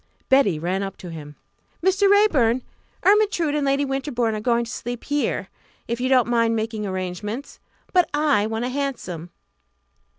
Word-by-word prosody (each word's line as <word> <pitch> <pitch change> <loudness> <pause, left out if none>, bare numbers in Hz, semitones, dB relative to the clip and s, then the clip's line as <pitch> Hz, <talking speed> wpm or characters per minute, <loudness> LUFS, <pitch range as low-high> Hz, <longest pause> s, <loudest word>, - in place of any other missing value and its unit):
Betty 265 - +4
ran 180 +5 -1
up 195 -1 -5
to 175 - -9
him. 150 -2 -9 0.5
"Mr. 390 +1 +4
Raeburn! 280 - +4 0.4
Ermyntrude 400 -6 +3
and 295 -1 0
Lady 275 +1 +2
Winterbourne 265 -4 -1
are 215 - -2
going 235 +1 +1
to 235 - -8
sleep 240 -1 -5
here, 290 0 -1 0.4
if 235 +1 -3
you 255 - 0
don't 255 -3 +4
mind 230 -1 +2
making 220 -1 -2
arrangements. 190 +7 -5 0.3
But 360 -3 +4
I 290 -8 +2
want 225 +2 -2
a - - -2
hansom." 250 - -4
240 Hz, 160 wpm, -23 LUFS, 210-285 Hz, 0.5 s, Betty